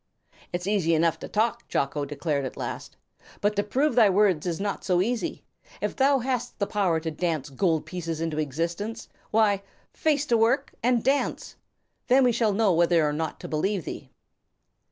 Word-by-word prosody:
"It's 175 0 -3
easy 190 -5 +2
enough 165 +1 +2
to - - -7
talk," 230 +2 -1
Jocko 140 +1 -1
declared 145 0 -2
at 130 - -6
last, - - -6 0.4
"but 205 +1 +1
to 205 - +2
prove 265 +8 +1
thy 225 -4 +6
words 185 -4 +2
is 170 0 -2
not 200 0 -3
so 180 -2 +2
easy. 230 +5 -1 0.4
If - - -2
thou 275 +1 +4
hast 250 -1 -2
the 200 - 0
power 190 -6 +1
to 160 0 -4
dance 155 -3 -2
gold 160 +2 +1
pieces 165 -3 -4
into 160 -2 -2
existence, 170 - -3 0.2
why, 210 -3 +3 0.3
face 295 -2 +1
to 240 -5 +2
work 245 +5 +2
and 240 -1 +2
dance! 275 +2 0 0.5
Then 260 +2 +5
we 250 - +4
shall 225 -2 +2
know 200 -1 +3
whether 170 -2 +3
or 150 - -1
not 160 +1 -3
to - - -6
believe 185 +3 -1
thee." - - -7
195 Hz, 180 wpm, -26 LUFS, 165-230 Hz, 0.5 s, thy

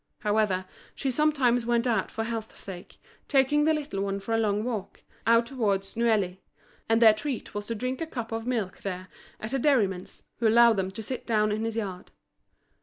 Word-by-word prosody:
However, 210 -3 +1 0.3
she 270 - -1
sometimes 255 -5 +2
went 240 0 +2
out 225 -5 +1
for 225 - -3
health's 225 -1 -5
sake, 185 -2 -9 0.3
taking 290 +2 +3
the 315 - +4
little 285 -10 -3
one 200 0 -1
for 200 +3 -4
a - - +3
long 210 -1 +1
walk, 220 -5 -5 0.2
out 230 0 +5
towards 205 -6 -1
Neuilly; 215 -6 +1 0.5
and 225 0 +4
their 225 -2 +8
treat 260 +2 -4
was 205 0 -4
to 230 - -2
drink 255 +5 -3
a 325 - -2
cup 235 -7 -5
of 225 +1 -3
milk 220 -7 -2
there 185 -1 -5 0.3
at 220 +4 -5
a 270 - +1
dairyman's, 205 -10 +1 0.2
who 230 - +3
allowed 230 0 +6
them 190 -1 0
to 215 +4 -7
sit 255 +3 -5
down 215 -2 +2
in 215 +2 -1
his 225 -1 -3
yard. 195 -5 -4
225 Hz, 195 wpm, -27 LUFS, 200-245 Hz, 0.5 s, their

